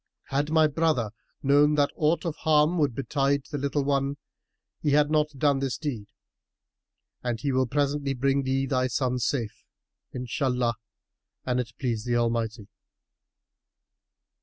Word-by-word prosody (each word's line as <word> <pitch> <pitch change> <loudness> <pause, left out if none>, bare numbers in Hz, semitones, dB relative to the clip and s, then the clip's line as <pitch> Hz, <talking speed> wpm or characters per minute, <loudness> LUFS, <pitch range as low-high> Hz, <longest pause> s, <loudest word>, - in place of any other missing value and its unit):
Had 145 +2 0
my 160 0 +4
brother 150 -7 +1 0.3
known 145 +2 +4
that 145 -1 +2
aught 160 +4 +1
of 165 -3 -2
harm 155 +2 +3
would 145 -6 +1
betide 140 +1 0
the 145 - -2
little 140 +1 0
one, 140 0 0 0.6
he 145 -2 +1
had 150 0 +4
not 150 -1 +3
done 140 0 +2
this 135 -2 -2
deed; 125 -10 -4 1.1
and 120 -2 -2
he 140 +5 -1
will 130 -1 +2
presently 140 +1 0
bring 135 +2 +1
thee 135 0 0
thy 130 -2 +1
son 125 0 -1
safe, 120 -3 -2 0.5
Inshallah—an 125 -1 -3
it 115 -2 -4
please 115 -5 -2
the 120 0 -1
Almighty." 115 -2 -1
135 Hz, 135 wpm, -26 LUFS, 125-145 Hz, 1.1 s, my